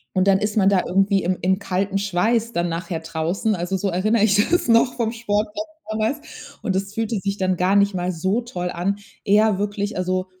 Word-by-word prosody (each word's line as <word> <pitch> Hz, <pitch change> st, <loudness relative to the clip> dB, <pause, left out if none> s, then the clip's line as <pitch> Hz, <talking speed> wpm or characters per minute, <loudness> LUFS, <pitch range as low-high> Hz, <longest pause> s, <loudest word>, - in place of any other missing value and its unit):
und 185 Hz, 0 st, +2 dB
dann 195 Hz, -1 st, +5 dB
ist 210 Hz, +1 st, -2 dB
man 195 Hz, -2 st, +4 dB
da 195 Hz, -2 st, +3 dB
irgendwie 195 Hz, +1 st, +2 dB
im 180 Hz, +1 st, -1 dB
im 190 Hz, +1 st, +2 dB
kalten 195 Hz, 0 st, -1 dB
Schweiß 215 Hz, +4 st, 0 dB
dann 170 Hz, -4 st, 0 dB
nachher 170 Hz, 0 st, -4 dB
draußen. 165 Hz, +7 st, -1 dB
Also 180 Hz, +1 st, -2 dB
so 200 Hz, +1 st, -1 dB
erinnere 205 Hz, +4 st, +2 dB
ich 205 Hz, -2 st, +4 dB
das 350 Hz, -5 st, +1 dB
noch 230 Hz, +2 st, +4 dB
vom 230 Hz, -2 st, -1 dB
Sport 215 Hz, -2 st, -1 dB
von 315 Hz, -8 st, -6 dB
damals. 280 Hz, +4 st, -4 dB
Und 190 Hz, -, -1 dB
das 195 Hz, +2 st, -2 dB
fühlte 225 Hz, -1 st, -1 dB
sich 200 Hz, 0 st, -2 dB
dann 185 Hz, -1 st, +1 dB
gar 185 Hz, +3 st, +2 dB
nicht 200 Hz, 0 st, +3 dB
mal 180 Hz, 0 st, -1 dB
so 190 Hz, +7 st, 0 dB
toll 180 Hz, -7 st, -4 dB
an. 180 Hz, +4 st, -1 dB, 0.3 s
Eher 210 Hz, 0 st, +3 dB
wirklich, 205 Hz, +1 st, -2 dB
also 185 Hz, 0 st, -1 dB
200 Hz, 215 wpm, -22 LUFS, 185-220 Hz, 0.3 s, dann